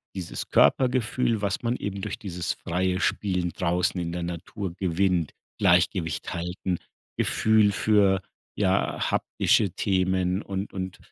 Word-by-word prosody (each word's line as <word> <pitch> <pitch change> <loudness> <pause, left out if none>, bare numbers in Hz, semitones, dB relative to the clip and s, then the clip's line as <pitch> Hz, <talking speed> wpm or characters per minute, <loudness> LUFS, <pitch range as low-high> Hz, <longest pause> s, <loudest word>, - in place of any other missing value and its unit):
dieses 90 -3 -5
Körpergefühl, 125 -3 +3
was 100 +3 -1
man 120 +1 0
eben 100 -1 -4
durch 105 - -4
dieses 90 -6 -3
freie 90 +2 -1
Spielen 90 -4 0
draußen 90 +2 0
in 85 -1 -3
der 90 0 -3
Natur 85 +2 -5
gewinnt, 90 -2 +1 0.3
Gleichgewicht 85 -1 +2
halten, 90 +1 -3 0.4
Gefühl 110 -1 +3
für, 100 -2 +3 0.4
ja, 95 -1 +1
haptische - - +2
Themen 95 0 0
und 95 -1 -5
und 95 -1 -5
95 Hz, 125 wpm, -26 LUFS, 90-100 Hz, 0.4 s, Körpergefühl